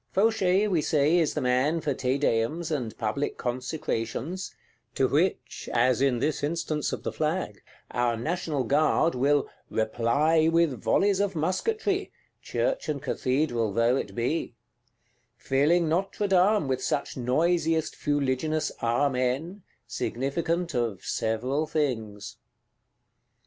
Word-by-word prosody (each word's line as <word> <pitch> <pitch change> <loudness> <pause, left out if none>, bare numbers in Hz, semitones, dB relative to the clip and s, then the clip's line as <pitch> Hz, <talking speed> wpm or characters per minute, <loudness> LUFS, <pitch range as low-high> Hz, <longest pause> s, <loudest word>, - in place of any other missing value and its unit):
Fauchet, 200 -1 +3
we 180 -6 +1
say, 150 +3 +2
is 160 - +1
the - - -1
man 130 +6 +2
for 145 -2 -1
Te 130 +1 0
Deums, 145 +6 0
and 125 -7 -3
public 130 +6 -2
Consecrations;—to 130 +5 -3
which, - - -1
as 125 +2 +2
in 135 -3 +3
this 145 +5 -1
instance 155 0 -1
of - - -5
the - - -2
Flag, 155 - -2 0.3
our 120 -1 0
National 155 +1 -2
Guard 155 +5 +2
will 140 +3 +2 0.2
"reply 140 +9 +2
with 165 -7 +2
volleys 200 -1 +2
of 200 -2 0
musketry," 390 - -1 0.3
Church - - -1
and 150 -2 -1
Cathedral 130 -4 0
though 115 +3 +3
it - - -4
be; 120 +2 -2 0.8
filling 150 +7 +2
Notre 190 +5 0
Dame 190 -2 +3
with 130 -1 -1
such 140 - -1
noisiest 160 +5 +1
fuliginous 145 +2 0
Amen, 130 - 0 0.3
significant 165 +8 -2
of 115 -7 -2
several 125 +7 -1
things. 110 -10 -3
145 Hz, 120 wpm, -27 LUFS, 125-165 Hz, 0.8 s, Fauchet